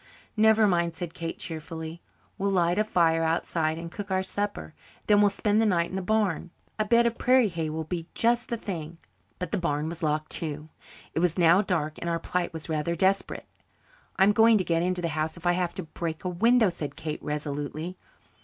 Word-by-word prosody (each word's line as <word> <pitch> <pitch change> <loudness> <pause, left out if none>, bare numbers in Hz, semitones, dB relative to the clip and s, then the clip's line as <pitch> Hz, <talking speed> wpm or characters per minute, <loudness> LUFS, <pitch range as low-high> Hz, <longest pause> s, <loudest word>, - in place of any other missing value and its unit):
"Never 220 0 +5
mind," 170 -3 +1
said 170 -1 -5
Kate 165 -1 -5
cheerfully, 160 0 -6 0.4
"we'll 200 +1 +1
light 175 0 +2
a - - +4
fire 165 -5 +2
outside 160 -1 0
and 165 0 -7
cook 205 +1 -7
our 190 0 +1
supper 205 - -2
and 80 0 -14 0.3
then 210 -1 +5
we'll 205 - +5
spend 210 +2 +1
the - - +3
night 170 -4 +1
in - - -5
the 190 - -1
barn. 200 -3 0 0.3
A 215 - +2
bed 235 +2 +4
of 235 0 -1
prairie 255 -3 +4
hay 165 -3 -3
will 160 +1 -3
be 165 +1 -5
just 235 +1 +1
the 235 - -1
thing." 170 -6 -6 0.4
But 180 -2 -5
the - - 0
barn 150 -2 -1
was 170 0 -7
locked 155 -1 -1
too. 155 -1 -3 0.4
It - - 0
was 175 0 +1
now 175 +2 +5
dark 160 -6 -2
and 170 - -3
our 170 - +1
plight 180 +1 -2
was 160 -3 -6
rather 160 +1 -1
desperate. 190 +3 0 0.7
"I'm 195 +2 +5
going 225 +1 +6
to 190 - 0
get 165 -2 +1
into 180 0 -1
the 170 - 0
house 155 +2 -2
if 170 - -13
I 175 - +4
have 175 -1 -1
to 185 - -4
break 160 0 -5
a 180 - -1
window," 230 +4 +4
said 145 -4 -6
Kate 155 -1 -5
resolutely. 150 +3 -4
170 Hz, 215 wpm, -27 LUFS, 160-200 Hz, 0.7 s, going